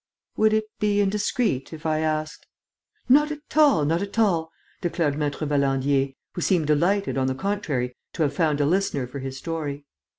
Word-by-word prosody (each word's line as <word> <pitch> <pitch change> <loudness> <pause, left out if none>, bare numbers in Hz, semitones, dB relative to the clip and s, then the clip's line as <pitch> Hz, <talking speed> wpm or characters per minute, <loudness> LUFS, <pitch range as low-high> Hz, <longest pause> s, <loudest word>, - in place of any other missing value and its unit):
"Would 215 0 +3
it 215 0 +2 0.2
be 205 -1 +2
indiscreet, 205 - 0
if 160 0 -10
I 155 -1 +1
asked 155 -1 -2 0.3
...?" - - -45
"Not 295 +4 +5
at 300 0 -9
all, 290 - +5
not 165 +4 +1
at 200 +2 -5
all," 175 -8 +2 0.3
declared 170 -4 0
Maître 150 +1 -2
Valandier, 135 -1 +1 0.2
who 175 - -4
seemed 170 -2 +2
delighted, 170 +3 +1
on 130 - +1
the 130 - -1
contrary, 140 -9 -2 0.2
to 160 - 0
have 145 -2 0
found 150 -1 +1
a 145 - +3
listener 160 -5 +1
for 125 +3 -7
his 135 0 -5
story. 145 -2 -4
155 Hz, 185 wpm, -24 LUFS, 140-200 Hz, 0.3 s, Not